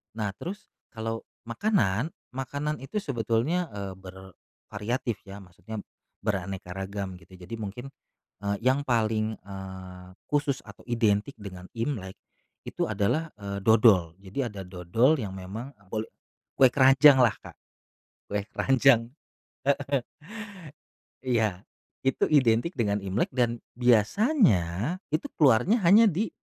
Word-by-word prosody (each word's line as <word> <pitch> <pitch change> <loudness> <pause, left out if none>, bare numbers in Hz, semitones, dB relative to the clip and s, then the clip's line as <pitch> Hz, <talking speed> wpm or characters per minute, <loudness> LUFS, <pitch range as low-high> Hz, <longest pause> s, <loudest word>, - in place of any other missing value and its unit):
Nah, 105 -3 -2
terus 205 +5 -7 0.2
kalau 115 0 -4 0.2
makanan, 120 - +1 0.2
makanan 140 +4 -3
itu 205 +11 -4
sebetulnya, 130 - 0
eee, 100 -2 -5
bervariatif 100 +5 -6
ya 100 +1 -8
maksudnya 105 +5 -9 0.4
beraneka 95 -2 -3
ragam 95 0 -4
gitu. 95 - -19
Jadi 90 +5 -8
mungkin, 110 +6 -6 0.5
eee, 100 0 0
yang 130 +3 +3
paling, 110 -2 +1
eee, 95 -2 -9 0.2
khusus 145 -2 0
atau 105 -1 -14
identik 115 +1 +1
dengan 95 -3 -9
Imlek, 115 -6 -3 0.5
itu - - -2
adalah, 155 +11 0
eee, 100 -1 -4
dodol. 105 -7 +5
Jadi 95 +6 -8
ada 105 -4 -7
dodol 95 - +2
yang 105 -5 -4
memang 105 +8 -7 0.2
kole 110 0 -2 0.5
kue 130 - +8
keranjanglah, 135 -3 +6
Kak. - - -12 0.7
Kue 100 0 -1
keranjang. 130 -3 +4 0.8
Heeh. 140 -3 +2 1.2
Iya. 110 -6 0 0.4
Itu 135 - +2
identik 130 +2 +3
dengan 105 -3 0
Imlek 95 +6 -1
dan 120 -2 +1
biasanya 120 - +3
itu 155 +2 -1
keluarnya 150 - +4
hanya 205 +7 +7
di 205 +2 +1
115 Hz, 120 wpm, -27 LUFS, 100-135 Hz, 1.2 s, kue